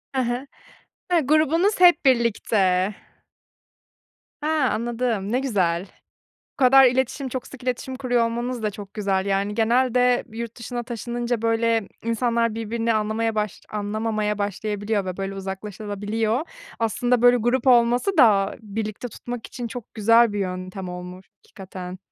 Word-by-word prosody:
Hı 260 - +2
hı. 245 +3 -2 0.7
Hıı, 340 - +5
grubunuz 320 +7 +2
hep 355 -3 +6
birlikte. 210 -6 +2 1.5
He, 300 - -2
anladım, 235 -6 0
ne 250 - +2
güzel. 190 -8 0 0.7
Bu - - -
kadar 270 0 +7
iletişim, 260 +2 0
çok 255 0 -5
sık 270 -2 -12
iletişim 255 +1 -3
kuruyor 245 -3 +1
olmanız 240 +1 -3
da 215 - 0
çok 205 -1 -10
güzel, 195 -2 0
yani, 200 +1 0
genelde 245 +2 +2
yurt 230 0 -6
dışına 240 +1 -4
taşınınca, 240 0 -3
böyle, 225 -1 +1 0.2
insanlar 230 -1 0
birbirini 230 +1 -1
anlamaya 220 +1 0
baş 210 -2 -2
anlamamaya 215 0 -2
başlayabiliyor 205 +1 -2
ve, 185 -1 -5
böyle, 195 0 -4
uzaklaşılabiliyor 205 +3 -3
da. - - -5 0.3
Aslında 240 +2 +1
böyle 245 0 +7
grup 240 +2 0
olması 245 +9 +4
da 205 -6 +5
birlikte 215 +2 -5
tutmak 240 +1 -7
için 245 - -6
çok 240 -1 -9
güzel 230 +1 +4
bir 205 - -3
yöntem 185 0 -4
olmuş 180 +1 -8 0.2
hakikaten. 185 -1 -9
225 Hz, 140 wpm, -23 LUFS, 205-245 Hz, 1.5 s, kadar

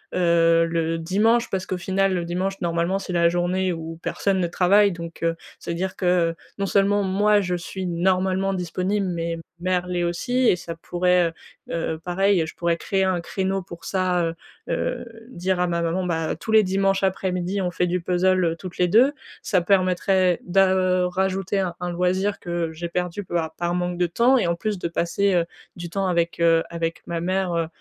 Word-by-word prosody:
heu, 165 -1 +4
le 165 0 -1
dimanche 220 +8 +2
parce 190 -1 -2
qu'au 185 - -2
final 190 +2 +1
le 175 -2 -1
dimanche 185 +3 -2
normalement 170 +2 0
c'est 190 -1 -6
la 170 -1 +4
journée 180 +1 0
où 165 0 -7
personne 195 +1 0
ne 175 - +1
travaille, 200 +4 +4
donc 170 -1 -8
heu, 165 0 +1 0.2
c'est-à-dire 185 +3 -3
que 175 -2 +2 0.2
non 200 - -1
seulement 200 +1 +2
moi 205 +2 +3
je 180 -2 -1
suis 185 +2 -5
normalement 185 +2 +1
disponible, 185 +3 -1
mais 170 -2 -2 0.2
mère 180 0 0
l'est 180 -1 -1
aussi 245 +9 0
et - - +5
ça 170 -1 -7
pourrait, 180 +1 +1
heu 165 - -6 0.4
heu 165 -1 -1
heu, - - -11
pareil, 180 +1 +1
je - - -9
pourrais 170 -1 0
créer 190 +2 0
un 185 -2 +1
créneau 190 +2 -2
pour 170 -2 -11
ça, 185 -2 +1
heu 165 - -2 0.4
heu, - - -2 0.2
dire 185 -4 -1
à 180 - +2
ma 170 -1 -1
maman 170 +3 -1
bah 165 -2 -1
tous 220 - -5
les 220 -1 +7
dimanches 195 0 +1
après-midi, 190 0 -1
on 180 - 0
fait 180 +1 0
du 180 +1 0
puzzle, 185 +1 +2
heu, 165 0 0
toutes 180 +1 -9
les 180 - +4
deux, 240 +9 +5 0.3
ça 185 - +2
permettrait 185 -1 +2
da, 190 +1 +4
heu, 185 -1 +2
rajouter 190 +1 -1
un 180 -1 -3
loisir 185 +3 0
que 170 -2 -3
j'ai 170 +2 -5
perdu 180 +3 -3
bah 160 -2 -1
par 175 0 0
manque 180 0 -2
de 175 - +2
temps 240 +9 +3
et 185 - +1
en 170 - +1
plus 210 +2 -3
de 170 - -2
passer, 175 +4 0
heu, 170 -1 +2 0.3
du 175 -1 -7
temps 195 +2 -1
avec, 170 -1 0
heu, 165 -1 +4
avec 165 -1 -4
ma 170 -1 -2
mère, 185 +1 -1
heu 165 -1 0
180 Hz, 200 wpm, -23 LUFS, 170-190 Hz, 0.4 s, les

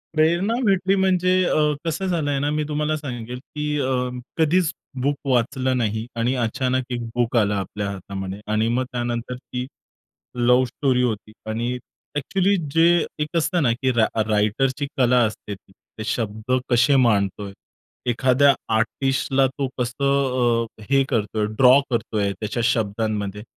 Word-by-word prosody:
प्रेरणा 170 +7 +2
भेटली 195 -2 +2
म्हणजे 185 -1 +2
अ, 155 - +2 0.3
कसं 165 +4 -2
झालं 165 -5 0
आहे 140 - 0
ना, 145 +1 0
मी 150 0 0
तुम्हाला 150 +1 -1
सांगेल 125 -4 -6
की 150 +2 -3
अ, 130 -2 0 0.3
कधीच 165 +2 +3 0.3
बुक 140 +2 +1
वाचलं 130 0 +1
नाही 110 -1 -1
आणि 120 +3 +1
अचानक 130 +2 0
1 120 -1 -2
बुक 120 0 0
आलं 105 -2 +3
आपल्या 100 +1 -3
हातामध्ये 95 0 -6
आणि 110 +1 +2
मग 125 +2 +1
त्यानंतर 120 0 -3
ती 125 0 -6 0.8
लव 125 +1 +5
स्टोरी 125 0 0
होती 110 -3 -2 0.2
आणि 120 +3 -1 0.4
एक्चुअली 190 +7 +1 0.2
जे 165 +1 +5 0.3
एक 150 +3 -3
असतं 170 +1 +1
ना 120 - +3
की 130 +3 0
रा 115 -2 +3 0.2
रायटरची 120 +7 +1
कला 125 -1 +4
असते 105 -1 -6
ती, 95 0 -21 0.3
ते 110 - -4
शब्द 110 +1 -2 0.2
कसे 125 +4 +4
मांडतोय. 100 -5 +1 0.6
एखाद्या 130 +3 +4 0.2
आर्टिस्टला 135 +4 +1
तो 135 +1 -3
कसं 125 -2 +1 0.2
अ, - - -11
हे 135 0 +5
करतोय, 105 -1 0
ड्रॉ 130 +1 +7
करतोय, 105 -4 -1
त्याच्या 110 +2 -2
शब्दांमध्ये. 105 -2 -1
125 Hz, 150 wpm, -22 LUFS, 110-145 Hz, 0.8 s, ड्रॉ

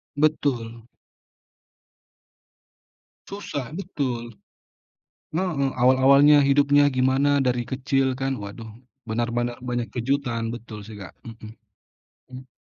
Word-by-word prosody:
Betul. 125 -6 -1 2.4
Susah, 150 -9 -6
betul. 130 - -4 0.9
Heeh, 155 -6 -1
awal-awalnya 140 +3 +6
hidupnya 145 +1 +4
gimana 135 +2 +2
dari 125 -2 0
kecil 130 +1 -1
kan? 135 0 -2
Waduh, 105 +1 -8 0.4
benar-benar 120 +1 -2
banyak 120 -2 -2
kejutan, 120 -2 -1
betul 110 -3 -9
sih, 110 +1 -11
Kak. 95 - -10
Mhm. 110 -1 -11 0.8
Mmm 130 0 -10
130 Hz, 90 wpm, -24 LUFS, 115-140 Hz, 2.4 s, awal-awalnya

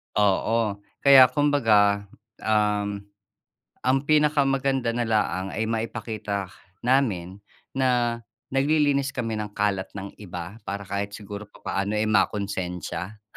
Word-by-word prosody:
Oo 105 +1 +2 0.2
kaya 135 -2 +9
kumbaga, 110 -9 +3 0.3
um, 105 -2 0 0.8
ang 130 +1 +2
pinakamaganda 140 -4 +2
na 120 0 -1
laang 105 -4 0
ay 110 - -1
maipakita 110 -4 -3 0.3
namin 105 -8 +1 0.3
na 125 -3 +1 0.3
naglilinis 140 0 +2
kami 115 -3 -2
ng 105 -1 -5
kalat 100 -2 0
ng 100 0 -8
iba 90 +1 -7
para 100 0 -4
kahit 100 +1 -4
siguro 105 0 -8
papaano, 100 0 -3
eh, 110 +1 +1
makonsensya. 95 -1 -1
105 Hz, 110 wpm, -25 LUFS, 100-130 Hz, 0.8 s, kaya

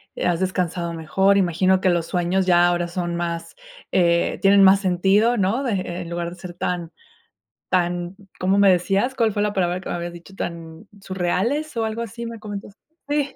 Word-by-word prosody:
eh, - - -3
has 175 -1 +1
descansado 180 -2 -2
mejor. 190 +5 +2
Imagino 185 +1 +2
que 185 - +3
los 170 -2 +1
sueños 180 +2 0
ya 175 -1 +5
ahora 175 0 0
son 175 0 -3
más, 170 - -4 0.4
eh, 170 -2 +2
tienen 195 0 +6
más 195 +1 +7
sentido, 195 +5 +2
¿no? 210 +7 +1
De 245 - -1
e 185 -2 -3
en 170 - -7
lugar 170 0 -3
de 175 - -10
ser 175 -1 -8
tan, 175 -1 -3 0.8
tan, 175 0 0 0.2
¿cómo 190 +2 +2
me 200 - +6
decías?, 195 +7 +1
¿cuál 230 -4 +2
fue 205 - -1
la 210 0 0
palabra 180 -1 0
que - - -8
me - - -2
habías 175 0 -5
dicho?, 175 +3 -13
¿tan 165 +3 -7
surreales 195 - -2
o 225 - +1
algo 220 +1 -3
así, 235 +1 -7
me 230 - -7
comentaste? 205 -1 -8 0.3
Sí. 290 -2 -1
185 Hz, 200 wpm, -22 LUFS, 175-200 Hz, 0.8 s, más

